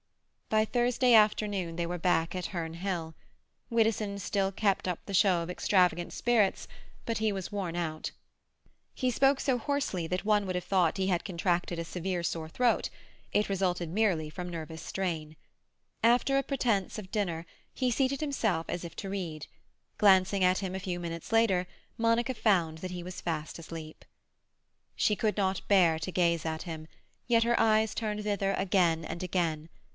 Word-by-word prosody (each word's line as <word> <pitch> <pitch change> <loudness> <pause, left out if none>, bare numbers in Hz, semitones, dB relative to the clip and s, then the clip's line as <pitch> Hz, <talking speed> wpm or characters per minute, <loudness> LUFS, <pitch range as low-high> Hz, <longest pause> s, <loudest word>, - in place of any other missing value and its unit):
By 215 0 +3
Thursday 245 +1 +2
afternoon 205 -5 +3
they 170 - 0
were 175 +1 -4
back 165 0 +1
at 180 - -2
Herne 165 -3 -4
Hill. 170 -2 -3 0.6
Widdowson 220 -3 +1
still 195 0 0
kept 195 -1 0
up 180 -2 -1
the 200 - -6
show 185 -2 +4
of 165 - -7
extravagant 180 -2 +2
spirits, 230 -5 +1 0.4
but 230 -2 -1
he 220 -1 +1
was 195 0 -5
worn 185 -5 -3
out. 160 -3 -3 0.8
He 255 -1 0
spoke 270 +3 +3
so 260 -3 +1
hoarsely 235 - -1
that 180 +3 -2
one 210 -1 +3
would 185 -1 -3
have 180 - -2
thought 180 -4 +2
he 190 0 0
had 175 -3 +1
contracted 175 -2 -1
a 165 - -3
severe 180 +1 -3
sore 160 -2 -3
throat; 245 +6 +1 0.4
it 210 - +2
resulted 180 -3 -1
merely 180 -5 +1
from 180 +3 -6
nervous 160 -1 -6
strain. 160 -5 -3 0.7
After 245 +4 +4
a 275 - +2
pretence 230 -10 0
of 195 -3 -8
dinner, 175 -7 -1 0.3
he 255 -1 0
seated 270 +2 +1
himself 220 - 0
as 175 - -3
if 170 - -7
to 195 - -5
read; 170 -6 -4 0.5
glancing 190 -1 +5
at 185 +1 +4
him 190 -2 -3
a - - -2
few 180 -1 -3
minutes 170 +1 -6
later, 220 -5 +3 0.3
Monica 230 +2 +2
found 175 -9 +1
that 185 +2 -5
he 180 -1 -5
was 180 +1 -7
fast 160 -2 -3
asleep. 160 -1 -9 0.9
She 210 - +2
could 215 0 0
not 190 -2 0
bear 175 -5 +5
to 160 +3 -4
gaze 170 -2 +1
at 160 0 -3
him, 160 -3 -7 0.4
yet 230 -2 +4
her 235 +1 +2
eyes 220 -1 +3
turned 210 -2 -2
thither 200 -2 0
again 175 -4 +2
and 170 - -5
again. 165 -3 -1
185 Hz, 175 wpm, -30 LUFS, 170-215 Hz, 0.9 s, glancing